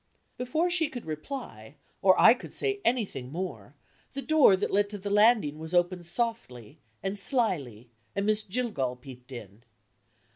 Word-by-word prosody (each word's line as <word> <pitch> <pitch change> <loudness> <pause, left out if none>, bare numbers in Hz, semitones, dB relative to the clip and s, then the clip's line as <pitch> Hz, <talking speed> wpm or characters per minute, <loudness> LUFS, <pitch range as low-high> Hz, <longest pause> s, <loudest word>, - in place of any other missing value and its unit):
Before 310 +8 0
she 325 -4 +1
could 245 -6 -8
reply, 155 - -7 0.3
or 190 -1 +5
I - - +8
could 250 - -10
say 405 -1 -1
anything 195 - -1
more, 180 +4 -6 0.4
the 275 0 -4
door 310 -10 +6
that 185 - -2
led 205 +1 +2
to 205 - -6
the 200 +1 -5
landing 205 -8 +4
was 160 +2 -4
opened 175 0 +1
softly 175 - -4 0.2
and 195 +1 -2
slyly, 145 - -1 0.2
and 200 0 -1
Miss 215 0 +2
Jillgall 195 - -2
peeped 125 0 -13
in. 110 -3 -10
195 Hz, 155 wpm, -28 LUFS, -, 0.4 s, I